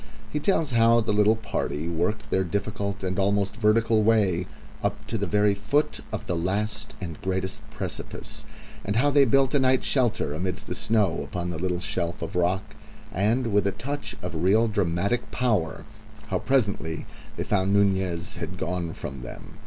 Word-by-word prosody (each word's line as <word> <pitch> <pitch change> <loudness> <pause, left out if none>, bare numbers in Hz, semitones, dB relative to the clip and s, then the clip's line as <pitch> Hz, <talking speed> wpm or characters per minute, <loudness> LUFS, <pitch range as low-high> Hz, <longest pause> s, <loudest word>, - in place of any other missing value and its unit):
He 150 - -1
tells 160 -3 +1
how 115 0 +5
the 105 - 0
little 105 +1 +5
party 85 -7 -3
worked 85 +6 -1
their 95 - +3
difficult 100 +2 -3
and 95 0 -1
almost 100 +1 +1
vertical 110 0 +3
way 100 -5 +3 0.3
up - - -2
to - - -4
the - - -1
very 105 0 +3
foot 110 +10 0
of - - -4
the 90 - -1
last 100 +5 -2
and 85 -5 -6
greatest 95 +3 -2
precipice, - - -6 0.4
and 100 - -2
how 145 +5 +3
they 140 -1 +6
built 135 +3 +3
a 145 - +4
night 130 -1 +3
shelter 120 - +1
amidst 90 +3 -3
the - - -4
snow 105 -7 +1
upon 90 -1 -4
a - - -4
little 90 +1 -1
shelf 85 -1 -3
of 85 - -5
rock, 95 +4 0 0.4
and, 110 +5 +1
with 100 -1 +3
a - - +2
touch 140 +8 -5
of 90 -1 -4
real 110 +5 +4
dramatic 100 +3 0
power, 110 -8 0 0.4
how - - 0
presently 105 - 0 0.3
they - - -1
found 95 -1 +1
Nunez 95 -4 +1
had - - -5
gone 85 -1 -2
from 65 -1 -7
them. 60 - -10
100 Hz, 175 wpm, -26 LUFS, 90-115 Hz, 0.4 s, they